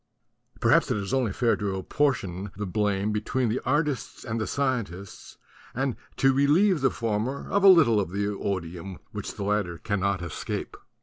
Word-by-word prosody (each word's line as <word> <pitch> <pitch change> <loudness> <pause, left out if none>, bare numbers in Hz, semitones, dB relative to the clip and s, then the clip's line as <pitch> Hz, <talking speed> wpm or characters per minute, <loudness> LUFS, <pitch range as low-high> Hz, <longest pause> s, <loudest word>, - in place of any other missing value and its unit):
Perhaps - - +4
it - - +1
is 100 +4 -4
only 130 -6 +1
fair 115 +3 +2
to 100 -2 -2
apportionate 100 -3 -1
the 105 - -4
blame 100 +1 0
between 110 +3 0
the 115 - -1
artists 145 0 -1
and 115 -2 -2
the - - -2
scientists 110 -9 -3 0.4
and 130 0 -1 0.2
to 135 0 +4
relieve 150 +6 +3
the 135 - +4
former 115 +4 -2
of 200 - +2
a - - +8
little 150 - +7
of 100 - -1
the 100 +2 -2
odium 95 -2 -4
which - - -6
the - - -4
latter 100 -4 0
cannot 100 -3 -1
escape. 85 - -5
105 Hz, 170 wpm, -26 LUFS, 100-135 Hz, 0.4 s, a